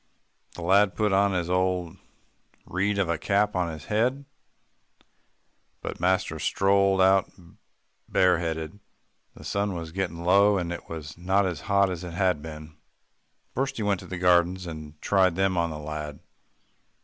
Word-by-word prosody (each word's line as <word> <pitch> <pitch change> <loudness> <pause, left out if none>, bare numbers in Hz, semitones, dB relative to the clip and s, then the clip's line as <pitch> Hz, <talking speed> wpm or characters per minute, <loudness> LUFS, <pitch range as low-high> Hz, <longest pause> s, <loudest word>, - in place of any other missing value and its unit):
The 85 - -7
lad 95 +1 +4
put 105 +1 +1 0.2
his 90 -3 -1
old 90 -1 0 0.7
weed 100 +3 -1
of 100 -3 +1
a 85 -2 -1
cap 105 +3 +1
on 90 -2 0
his 80 -1 -9
head, 125 +6 0 1.5
but - - -6
master 95 +2 0
strolled 95 0 +2
out 95 0 +4 0.8
bareheaded. 85 -1 +1 0.6
The - - -13
sun 100 -1 -1
was 80 -1 -6
getting 85 -2 -3
low, 100 +3 +5
and 85 -2 -2
it 85 - -9
was 80 -1 -8
not 95 +3 +2
as 85 -6 -3
hot 100 -1 +3
as 90 -1 -5
it 85 -1 -7
had 90 -5 +1
been. 75 -1 -10 0.8
First 135 +2 -2
he 110 - -2
went 100 -2 +1
to - - -11
the 95 - -5
gardens, 90 +1 +3
and 75 -2 -9
tried 95 -3 +3
them 95 0 +1
on 85 -1 +1
the 80 - -6
lad. 75 -1 -6
90 Hz, 155 wpm, -26 LUFS, 85-100 Hz, 1.5 s, low